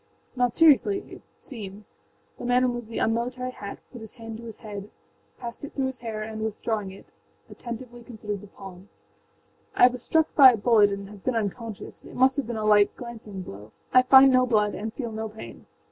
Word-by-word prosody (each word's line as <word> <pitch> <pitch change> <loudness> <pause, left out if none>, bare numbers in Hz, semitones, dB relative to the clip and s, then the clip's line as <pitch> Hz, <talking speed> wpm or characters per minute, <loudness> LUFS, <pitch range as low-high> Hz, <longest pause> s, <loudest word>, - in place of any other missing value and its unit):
âNot 245 -2 +1
seriouslyâit 330 +5 +3 0.2
seems.â 210 -5 -8 0.5
The - - -8
man 245 +1 +3
removed 240 -2 -2
the 230 - -7
unmilitary 250 +3 -1
hat, 200 -5 -8
put 240 - -10
his 220 - -11
hand 225 -2 -8
to 235 - -11
his 225 -2 -8
head, 205 -2 -8 0.5
passed 235 +1 -8
it 285 - -8
through 270 - 0
his 260 -1 -4
hair 220 -2 -5
and, 220 0 -6
withdrawing 220 -1 -2
it, 190 - -13 0.5
attentively 240 0 -8
considered 210 -4 -6
the 205 - -12
palm. 195 0 -12 0.9
âI 250 - +7
was 250 -1 -7
struck 320 +4 +1
by 265 -4 +9
a - - -2
bullet 215 -1 +4
and 200 0 -5
have 205 -2 -13
been 255 - -1
unconscious. 225 0 -5
It - - -12
must 260 +2 +3
have 280 - -2
been 235 -2 -4
a 215 - -2
light, 210 -1 +4
glancing 220 -5 -8
blow: 105 - -11 0.2
I 255 - +8
find 265 +1 +7
no 255 0 +4
blood 210 -3 +2
and 220 +2 -4
feel 235 -1 -5
no 220 0 -4
pain. 220 +1 -11
225 Hz, 200 wpm, -26 LUFS, 210-250 Hz, 0.9 s, by